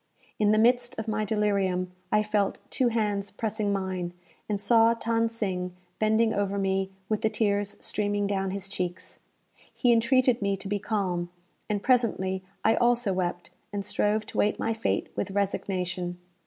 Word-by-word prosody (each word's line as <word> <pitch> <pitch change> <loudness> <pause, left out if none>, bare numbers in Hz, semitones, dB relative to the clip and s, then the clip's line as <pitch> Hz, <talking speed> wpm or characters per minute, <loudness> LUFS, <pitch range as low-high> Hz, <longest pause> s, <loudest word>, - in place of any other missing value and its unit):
In 210 -1 +4
the 215 - +4
midst 245 +2 +3
of 220 0 -4
my 215 0 0
delirium, 195 -4 0 0.2
I 210 - +4
felt 210 -2 0
two 255 - +2
hands 210 -4 0
pressing 215 -2 -2
mine, 185 -3 -2 0.4
and 205 -1 0
saw 225 +2 +5
Than 230 0 +1
Sing 185 -5 -2 0.2
bending 220 +1 +3
over 200 0 0
me, 195 -1 0 0.2
with 215 0 -1
the 220 - +2
tears 205 -2 0
streaming 205 -1 0
down 195 -1 0
his 195 0 -4
cheeks. 180 -2 -5 0.5
He 245 - +2
entreated 250 +1 +3
me 200 -1 +1
to 195 - -8
be 205 +1 -1
calm; 185 -5 -1 0.4
and 205 -1 -1
presently 195 -7 +1 0.2
I 225 - +4
also 240 -4 +3
wept, 175 -1 -2 0.2
and 200 -1 -3
strove 210 +1 +1
to - - -5
wait 210 - +2
my 225 - 0
fate 225 +1 -1
with - - -2
resignation. 185 -3 -2
205 Hz, 165 wpm, -27 LUFS, 195-220 Hz, 0.5 s, saw